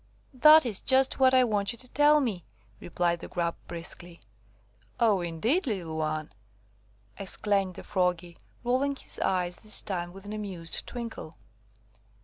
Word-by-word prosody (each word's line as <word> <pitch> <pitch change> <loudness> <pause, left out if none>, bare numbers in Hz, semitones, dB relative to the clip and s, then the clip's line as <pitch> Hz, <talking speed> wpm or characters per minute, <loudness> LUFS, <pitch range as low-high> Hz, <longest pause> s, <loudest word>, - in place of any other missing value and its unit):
"That 305 +3 +7
is 215 -5 -1
just 265 +1 +3
what 260 -1 +6
I 260 -1 +5
want 205 -4 +2
you - - -11
to 255 - -6
tell 295 +3 +4
me," 205 - -2 0.4
replied 175 0 -1
the - - -8
Grub 170 -1 -2
briskly. 170 0 -9 0.8
"Oh, 215 -5 +3
indeed, 220 - 0
little 180 -8 -3
one!" 155 -1 -3 0.9
exclaimed 195 -1 -1
the - - -9
Froggy, 180 -3 -1 0.3
rolling 260 +3 +1
his - - -8
eyes 180 -2 -1
this 215 -1 -1
time 175 -3 -3
with 195 +2 -13
an 205 - -6
amused 190 -6 -4
twinkle. 230 -9 -7
195 Hz, 145 wpm, -28 LUFS, 175-245 Hz, 0.9 s, That